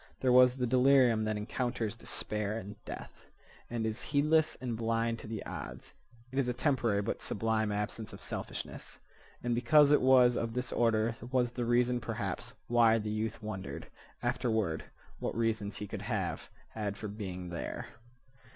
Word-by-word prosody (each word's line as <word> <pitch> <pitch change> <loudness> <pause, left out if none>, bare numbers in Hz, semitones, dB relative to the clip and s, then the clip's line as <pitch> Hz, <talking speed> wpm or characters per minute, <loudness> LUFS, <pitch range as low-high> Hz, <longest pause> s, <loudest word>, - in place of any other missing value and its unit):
There 130 - +2
was 125 0 +7
the 125 -1 0
delirium 125 -2 +5
that 110 0 -1
encounters 115 0 -2
despair 105 -2 -2
and 105 -1 -7
death, - - -9 0.4
and 115 -1 -2
is 110 +2 -2
heedless 155 +2 +2
and 125 -3 -3
blind 115 0 0
to - - -9
the 110 -2 -5
odds. - - -7 0.4
It 135 - -1
is 130 - +1
a 125 - 0
temporary 120 -7 +1
but - - -3
sublime 110 0 0
absence 105 +1 -3
of - - -10
selfishness. - - -6 0.5
And 120 0 +1
because 140 +5 +5
it 150 - +5
was 125 -2 +6
of 115 -1 -2
this 125 0 -2
order 115 -1 +2
was 125 -2 +2
the 120 0 -2
reason, 120 +1 +3
perhaps, - - -3 0.2
why 115 -1 +5
the 105 -1 -3
youth 110 0 -3
wondered, 100 -3 -5 0.4
afterward, 110 -8 0 0.3
what - - -3
reasons 110 -3 0
he 105 - -5
could 100 0 -6
have 100 -6 -2 0.2
had 105 -2 -4
for 110 - -5
being 95 -4 -6
there. 85 - -4
115 Hz, 165 wpm, -32 LUFS, 105-125 Hz, 0.5 s, was